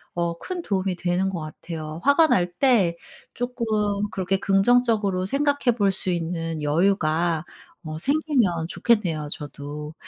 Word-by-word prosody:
어 170 -1 -1
큰 365 -2 -5
도움이 190 - -1
되는 180 +2 0
것 185 -3 -4
같아요. 155 0 -7
화가 300 +3 +5
날 175 - +1
때 205 -11 +3 0.4
쪼끔 245 0 -3 0.5
그렇게 190 0 -1
긍정적으로 200 -2 +2
생각해 280 +1 +1
볼 200 -3 +3
수 190 0 0
있는 165 -2 -3
여유가 165 0 +1 0.4
어 155 0 -6
생기면 250 - +1
좋겠네요 175 -10 +1
저도. 150 +1 -6
185 Hz, 270 characters per minute, -24 LUFS, 165-235 Hz, 0.5 s, 화가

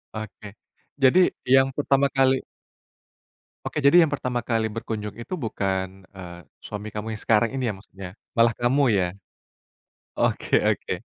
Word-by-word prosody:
Oke. 110 -1 -8 0.5
Jadi, 135 +6 +5 0.3
yang 135 +1 +5
pertama 140 0 +2
kali 135 -1 +2 1.2
Oke, - - -5
jadi 175 +5 +7
yang 160 - +3
pertama 125 -3 -2
kali 115 -1 0
berkunjung 105 -2 -5
itu 120 - -7
bukan, 95 - -3 0.2
eee, 85 -2 -9 0.3
suami 105 0 -6
kamu 110 +1 -5
yang 105 - -8
sekarang 115 +1 +3
ini, 135 -1 -2
ya, - - -2
maksudnya? 95 -1 -10 0.3
Malah 115 0 +5
kamu, 125 +4 +2
ya? 95 - +2 1.1
Oke - - +1
oke. - - -3
115 Hz, 140 wpm, -24 LUFS, 105-135 Hz, 1.2 s, jadi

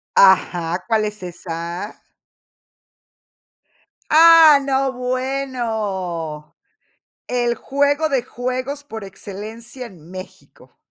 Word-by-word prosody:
Ajá, 180 -2 +4
¿cuál 220 -2 +2
es 210 -2 -5
esa? 175 +2 -6 2.1
¡Ah, 320 -2 +8
no, 270 -1 +1
bueno! 225 - -3 0.7
El 240 -1 0
juego 285 +5 +1
de 270 -4 +1
juegos 255 +3 -4
por 220 -7 -8
excelencia 220 +6 -8
en 175 -5 -15
México. 185 0 -12
230 Hz, 85 wpm, -20 LUFS, 185-265 Hz, 2.1 s, Ah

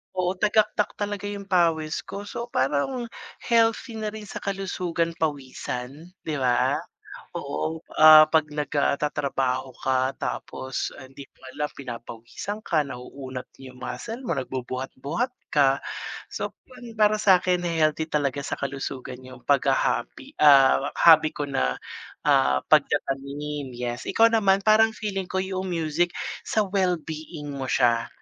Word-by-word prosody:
Oo, 180 -1 +1
tagaktak 210 0 +2
talaga 205 -1 -3
yung 200 -1 -5
pawis 165 -5 +1
ko. 200 - -7
So, 235 +3 -5
parang 150 - 0 0.4
healthy 230 0 +2
na 215 - -2
rin 215 0 -8
sa - - -6
kalusugan 180 -4 -2
pawisan, 140 +1 -4
‘di 155 - -2
ba? 125 -2 +2 0.6
Oo, 155 - -3 0.2
ah, 155 0 +10
‘pag 160 -1 +3
nag, 150 0 -4
ah, 140 - +3
tatrabaho 135 -3 -1
ka, 130 0 +1
tapos, 130 0 -4
ah, 140 - -10
hindi 135 0 -11
mo - - -31 0.2
alam 150 0 -2
pinapawisan 120 - -7
ka, 155 -2 +2
nauunat 130 0 -8
yung 130 -1 -11
muscle 220 - -5
mo, 170 - -1
nagbubuhat-buhat 130 - -3 0.2
ka. 135 -2 +3 0.5
So, - - -4
pan 250 -3 -12
para 215 0 +4
sakin, 180 -3 +3
eh, 165 -2 0
healthy 155 +1 +2
talaga 140 -2 0
sa - - -2
kalusugan 135 -2 -5
yung 130 -1 -12
paghaha-hobby, 125 - 0
ah, 140 -2 +6
hobby 160 -2 +7
ko 145 - -3
na, 65 - +1 0.5
ah, 65 0 +4
pagtatanim. 140 0 0
Yes, 120 0 -4
ikaw 230 0 +4
naman 200 -3 +3
parang 220 +1 +5
feeling 195 -4 -3
ko 190 - -1
yung 190 0 -3
music 165 0 0 0.4
sa 215 - +2
well-being 165 -5 -2
mo 135 -1 -4
siya 115 -2 +2
155 Hz, 140 wpm, -25 LUFS, 130-195 Hz, 0.6 s, ah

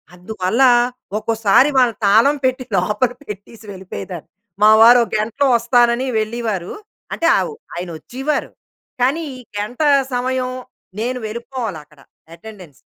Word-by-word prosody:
అందువల్ల, 190 +4 -2 0.6
ఒకోసారి 225 +4 +3
వాళ్ళని 240 -5 +3
తాళం 225 +9 +4
పెట్టి, 255 0 0
లోపల 210 +7 0
పెట్టీసి 210 0 -10
వెళిపోయేదాన్ని. 185 -2 -8 0.3
మా 215 - +8
వారో 240 +2 +8 0.2
గంటలో 225 +7 0
వస్తానని 240 +2 +2
వెళ్ళీవారు. 215 -5 -3 0.4
అంటే, 335 - -2
ఆవు 465 - -3 0.2
ఆయనొచ్చీవారు. 185 - -4 0.5
కానీ, 280 +7 +1
ఈ - - -11 0.2
గంట 215 +7 -5 0.3
సమయం 255 +1 -1 0.5
నేను 250 +2 -2
వెళిపోవాలక్కడ 215 - -7 0.4
ఎటెండెన్స్. 185 -8 -13
225 Hz, 105 wpm, -18 LUFS, 200-255 Hz, 0.6 s, మా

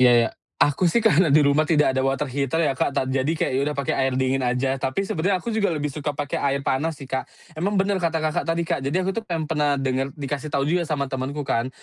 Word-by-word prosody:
Iya 125 -1 +7
iya. 115 -1 +4 0.3
Aku 145 +5 +3
sih 230 +6 +1
karena 180 -5 +5
di 145 +1 +5
rumah 150 +2 +3
tidak 150 -4 +3
ada 130 - 0
water 135 +2 0
heater, 140 +2 -1
ya, 135 - +2
Kak, 130 - 0
tad 130 - +1
jadi, 135 +2 0
kayak 160 -4 0
ya 130 - +1
udah 150 - -4
pake 140 - -1
air 130 -1 0
dingin 130 +1 +1
aja. 125 +2 0
Tapi, 135 +10 -1
sebenarnya 185 +2 0
aku 230 - -4
juga 215 -2 +1
lebih 150 -4 -2
suka 150 -1 -4
pake 145 -1 -2
air 140 0 0
panas 155 +4 0
sih, 140 - -9
Kak. 130 0 -3 0.2
Emang 195 +6 -1
bener 195 0 +1
kata 165 -1 0
Kakak 155 - 0
tadi, 165 +1 +1
Kak, 160 - -1
jadi, 150 +8 -1
aku 195 - 0
tuh 230 - -2
pen 170 -7 -3
pernah 150 -2 +1
denger 135 0 -2
dikasih 145 0 -4
tahu 140 -1 0
juga 170 +2 0
sama 140 -3 -2
temenku 135 +3 -3
kan, 115 -1 0
145 Hz, 260 wpm, -23 LUFS, 135-165 Hz, 0.3 s, Iya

